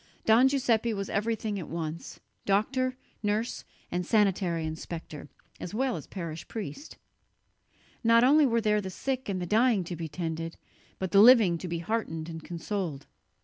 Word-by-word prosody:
Don 230 +4 +6
Giuseppe 235 -5 +1
was 195 -1 -4
everything 215 -1 -1
at 170 - -6
once: 165 0 -5 0.3
doctor, 255 +6 +1 0.2
nurse 210 +3 -1 0.3
and 180 +1 -1
sanitary 185 -5 +1
inspector, 160 -2 -7 0.3
as 180 - -6
well 260 +1 0
as - - -7
parish 165 -4 -6
priest. 220 - -7 1.1
Not 230 0 +5
only 290 +3 +6
were 230 -1 +1
there 210 -1 +2
the 190 - -5
sick 260 +5 -3
and 190 -2 -1
the 180 - -3
dying 220 +1 +3
to 175 +1 -5
be 165 0 -5
tended, 165 0 -4 0.4
but 190 -1 -3
the 200 - +7
living 215 -8 +7
to 180 - -5
be 170 0 -2
heartened 165 -4 -3
and 160 -1 -7
consoled. 170 -4 -4
200 Hz, 160 wpm, -28 LUFS, 170-230 Hz, 1.1 s, the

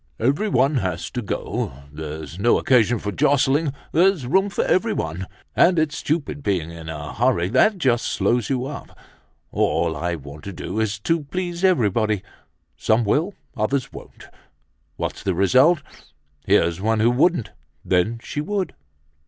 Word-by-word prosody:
"Everyone 140 - +2
has 90 -7 -2
to 125 - -3
go. 105 - -3 0.2
There's 80 +1 -7
no 120 +4 +4
occasion 120 -2 +3
for 105 -1 -4
jostling, 140 - +2 0.2
there's 175 -3 +3
room 190 +10 +2
for - - -1
everyone. 95 - 0 0.3
And 175 0 +5
it's 155 -2 +1
stupid 150 -1 -2
being 90 - -1
in 80 -1 -9
a 75 -2 -6
hurry 115 -7 +1
that 165 - +3
just 125 -8 +1
slows 120 -2 0
you 130 -2 0
up. 140 +1 -8 0.5
All 80 - +1
I 85 +3 -2
want 75 0 -11
to 100 - -6
do 105 - -4
is 110 -2 0
to 165 +6 0
please 175 +3 -4
everybody. 110 - +2 0.5
Some 110 +8 +2
will, 165 - +1 0.2
others 125 +5 -1
won't. - - -12 0.7
What's - - -4
the 95 -3 -1
result? 130 - +4 0.6
Here's 85 +2 +3
one 110 +1 +1
who 115 +2 +4
wouldn't, 140 - +2 0.3
then 95 +6 +1
she 145 - -4
would. 195 +3 -2
120 Hz, 150 wpm, -22 LUFS, 95-150 Hz, 0.7 s, And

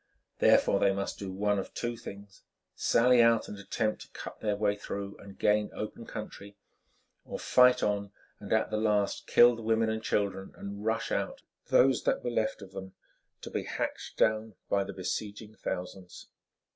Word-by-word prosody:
Therefore, - - +5
they 100 - +4
must 100 0 -3
do 100 -2 -5
one 100 +1 +1
of 95 - -7
two 120 0 -2
things—sally 115 +3 0
out 115 -1 +4
and 105 - -8
attempt 110 +2 -2
to - - -10
cut - - -9
their 105 -1 0
way 105 0 +1
through 100 -1 -6
and 100 -1 -12
gain 105 0 +2
open 110 +2 -6
country, 100 -2 -8 0.7
or - - -6
fight 125 0 +5
on 100 -1 0 0.3
and 100 - -9
at 110 0 +2
the 110 - 0
last 105 -2 0
kill 120 0 +7
the 115 - -8
women 110 0 +2
and 110 0 -3
children 100 -3 -1
and 100 +1 -7
rush 110 +1 -1
out, - - -2 0.2
those 130 -1 +4
that - - +1
were 120 - -1
left 110 -2 -1
of 95 - -12
them, 95 -1 -8 0.5
to - - -8
be - - -1
hacked - - -4
down 110 -1 +1
by 100 -1 +2
the - - -6
besieging 105 +3 -5
thousands. 90 -2 -6
105 Hz, 175 wpm, -30 LUFS, 100-110 Hz, 0.7 s, kill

